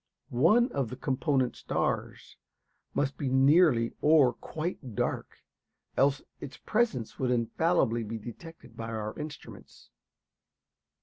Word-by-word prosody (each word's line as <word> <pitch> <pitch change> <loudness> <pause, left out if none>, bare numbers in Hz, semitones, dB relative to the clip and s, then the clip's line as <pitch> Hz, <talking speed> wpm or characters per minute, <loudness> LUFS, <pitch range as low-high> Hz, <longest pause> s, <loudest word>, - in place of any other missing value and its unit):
One 170 - +4
of 135 -5 -1
the 125 - -6
component 130 -1 0
stars - - -3 0.6
must 140 -1 0
be 140 - -2
nearly 135 -2 +4
or 150 -5 +5
quite 155 - -6
dark; - - -2 0.6
else 140 +1 +2 0.2
its 140 - -8
presence 215 - -1
would 130 - 0
infallibly 120 +1 +1
be 115 +1 -4
detected 120 +3 -11
by 115 0 -6
our 110 -1 -4
instruments. 150 -1 -10
135 Hz, 115 wpm, -29 LUFS, 120-155 Hz, 0.6 s, or